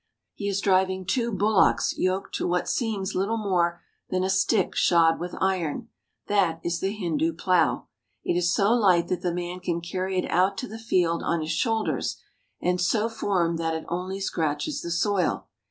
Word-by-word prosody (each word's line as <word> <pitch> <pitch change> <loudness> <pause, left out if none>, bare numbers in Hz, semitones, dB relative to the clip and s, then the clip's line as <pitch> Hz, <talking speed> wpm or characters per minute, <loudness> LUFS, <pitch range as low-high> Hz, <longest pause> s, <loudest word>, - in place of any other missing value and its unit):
He 200 - -5
is 200 -1 0
driving 190 -1 +2
two 235 +3 0
bullocks 205 0 +2
yoked 185 +1 -1
to - - -1
what 180 0 0
seems 210 -6 -1
little 200 +5 0
more 175 -5 0 0.3
than 185 0 0
a 190 - +1
stick 190 +1 +2
shod 165 -2 +4
with 175 +1 -5
iron. 190 +3 -1 0.4
That 185 -6 +1
is 170 0 -1
the 190 - 0
Hindu 165 -5 -1
plow. 170 0 +1 0.4
It - - 0
is 175 0 +2
so 200 +4 +3
light 190 -8 +3
that 180 -1 -1
the 180 - 0
man 175 +1 -4
can 170 -2 -2
carry 185 +2 -3
it 180 - +1
out 190 +3 +2
to 255 - -4
the 220 0 -8
field 175 -7 +1
on 170 -1 0
his 155 +1 -3
shoulders, 225 +3 -1 0.4
and 180 0 0
so 215 +5 +1
formed 175 -7 0
that 165 -1 -1
it 160 - -5
only 185 +3 -3
scratches 165 - -2
the 170 - -5
soil. 180 +2 0
185 Hz, 185 wpm, -26 LUFS, 170-200 Hz, 0.4 s, shod